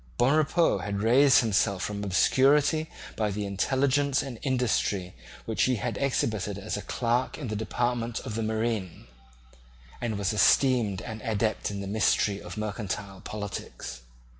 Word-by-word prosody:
Bonrepaux 155 +5 +3
had 100 -1 -3
raised 130 +4 +6
himself 100 -4 +1
from 105 -1 -3
obscurity 140 - +3 0.3
by 110 -2 0
the 105 +1 -3
intelligence 135 +7 +1
and 130 -5 -7
industry 120 -8 0 0.3
which 110 - -2
he 130 - +2
had 120 0 -3
exhibited 110 -7 -1
as 100 +2 -4
a 105 - -4
clerk 120 +3 -1
in 135 -7 -5
the 110 - -3
department 120 +1 -1
of 110 - -6
the 115 - -2
marine, 110 -4 -2 1.0
and 115 -3 -2
was 100 0 0
esteemed 110 -3 +3
an 110 -1 -7
adept 110 0 -1
in 100 -1 -5
the 100 - -5
mystery 100 -1 +1
of - - -9
mercantile 100 -2 -4
politics. 105 - -6
110 Hz, 145 wpm, -27 LUFS, 100-130 Hz, 1.0 s, raised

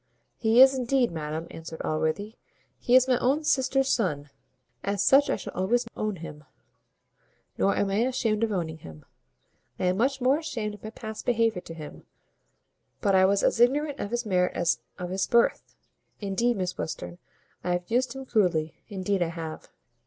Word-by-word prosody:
"He 225 +1 +3
is, 265 0 +6
indeed, 255 -2 +1
madam," 160 0 -4
answered 160 0 -8
Allworthy; 160 +7 -1 0.5
"he 245 - +2
is 255 0 +6
my 255 -2 +2
own 280 +5 +1
sister's 270 -2 +2
son 150 - -1 0.5
as 200 -1 0
such 280 +2 +5
I - - +2
shall - - -8
always 235 +6 +1
own 215 -1 -2
him; 155 -3 -9 1.1
nor 200 - +2
am 200 -1 0
I 195 - 0
ashamed 230 -4 0
of 225 - +1
owning 160 -5 -3
him. 80 - -12 0.7
I - - -4
am 180 +1 +1
much 265 +4 +1
more 265 +4 +3
ashamed 235 -10 -4
of 205 - -12
my 215 - -5
past 220 -1 -8
behaviour 225 -5 +2
to 165 -2 -10
him; 155 -2 -10 0.9
but 200 -2 +1
I 190 0 +6
was 200 +1 +2
as - - +2
ignorant 285 +4 +2
of 200 - -3
his 240 +1 -2
merit 180 -3 +1
as 175 0 +1 0.2
of 180 -1 -5
his 190 0 0
birth. 235 -1 +2 0.4
Indeed, 225 +4 0
Miss 185 -1 -3
Western, 175 +2 -5 0.4
I 180 - 0
have 175 +3 -4
used 245 +1 +1
him 270 0 -7
cruelly 180 -10 +1 0.2
Indeed 195 -1 -1
I 175 - +2
have." 165 -2 -7
205 Hz, 180 wpm, -27 LUFS, 175-245 Hz, 1.1 s, is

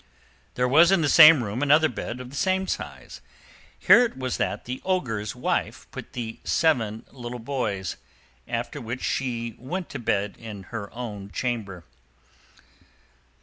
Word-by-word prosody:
There 125 0 +1
was 160 +7 +6
in 195 -3 +4
the 155 - +2
same 155 -4 +9
room 105 +4 -4
another 150 +2 +5
bed 125 -4 -6
of 125 0 -9
the - - -10
same 190 +5 +1
size. - - -6 0.6
Here 245 - +7
it 235 - -3
was 130 -1 -2
that - - -2
the 125 +1 -5
Ogre's 115 - -1
wife - - -2
put - - -9
the 115 -2 -5
seven 115 -10 +1
little 125 -2 -7
boys, 110 -7 -3 0.5
after 120 +5 -4
which 120 +2 -5
she 120 -3 -2
went 175 +8 -5
to 140 - -6
bed 105 -3 -1
in 105 -4 -8
her 100 -3 -5
own 105 -5 -7
chamber. 105 -7 -3
125 Hz, 150 wpm, -25 LUFS, 110-145 Hz, 0.6 s, same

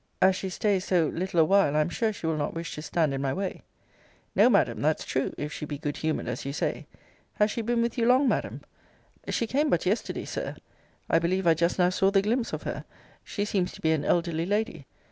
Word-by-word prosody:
As 190 0 +5
she 190 - -4
stays 190 0 0
so 170 -5 +2
little 180 0 -1
a 160 - +6
while, 195 -5 +3
I 155 - +4
am 150 - 0
sure 220 +5 0
she 205 - -8
will 160 -1 +1
not 150 +1 -2
wish 165 0 -5
to 150 - -6
stand 155 -2 0
in 135 - -2
my 135 -1 0
way. 190 0 -3 0.7
No, - - +6
Madam, - - +2
that's - - +1
true, - - -1
if 150 +1 -4
she - - -6
be 145 - -4
good 145 0 -4
humoured, 155 -5 -2
as 125 0 -3
you 140 - -3
say - - -2 0.5
Has 210 0 +2
she 230 - -2
been 235 +1 +1
with 235 +1 -2
you 230 - +2
long, 260 +3 +5
Madam? - - -1 0.7
She 230 - 0
came 290 +6 +1
but 175 - +1
yesterday, 200 +5 -1
Sir - - -4 0.5
I 165 - +3
believe 185 +3 0
I 165 - +6
just 170 +2 0
now 180 -1 +3
saw 190 +1 +3
the 195 -1 +3
glimpse 235 +3 0
of - - -4
her. - - -4 0.4
She 205 - -3
seems 185 -3 0
to - - -12
be 160 - +2
an 155 -2 +1
elderly 170 -1 0
lady. 205 -8 -1
180 Hz, 240 wpm, -27 LUFS, 160-210 Hz, 0.7 s, a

